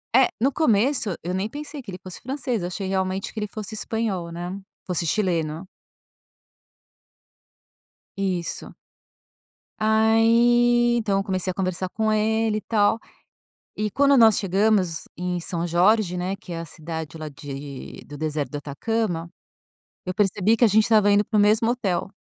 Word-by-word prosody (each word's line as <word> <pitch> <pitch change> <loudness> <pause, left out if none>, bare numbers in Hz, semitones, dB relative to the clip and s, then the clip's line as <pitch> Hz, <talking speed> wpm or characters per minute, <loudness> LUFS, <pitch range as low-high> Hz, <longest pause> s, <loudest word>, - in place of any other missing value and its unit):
É, 260 0 +6
no 270 +4 +3
começo, 235 - +2
eu 180 +2 -2
nem 190 +2 -1
pensei 295 +3 -8
que 210 - -8
ele 180 - -8
fosse 185 -2 -9
francês. 255 -4 -3
Eu 175 - -2
achei 190 +2 -4
realmente 190 0 -1
que 220 - -6
ele 210 - -2
fosse 215 +1 -7
espanhol, 205 -6 -2
né. 175 +3 -5 0.3
Fosse 175 -2 -1
chileno. 165 -2 -1 2.5
Isso. 185 -4 -3 1.1
Aí, 235 +2 +4
então 205 -4 +1
eu - - -1
comecei 185 -1 -2
a - - -7
conversar 185 0 -2
com 220 +3 -1
ele, 220 0 +1
e - - -4
tal. 215 0 +2 0.8
E 210 0 -2
quando 280 +4 +4
nós 225 -4 +6
chegamos 195 -3 +1
em 180 0 -2
São 170 0 -3
Jorge, 180 +2 +3
né, 185 +2 -2
que 195 -2 -12
é 165 - -4
a - - -7
cidade 160 -1 -7
lá 155 -1 -5
de 140 -1 -8
do 145 - -9
deserto 150 -3 -2
do 145 - -5
Atacama, 170 +4 -2 0.8
eu 185 - -3
percebi 205 +2 +2
que 240 - +1
a - - +8
gente 215 +1 +4
estava 210 -2 +4
indo 205 +1 +4
para 215 - -1
o - - +5
mesmo 220 +3 +3
hotel. 195 -8 -1
200 Hz, 160 wpm, -24 LUFS, 175-220 Hz, 2.5 s, a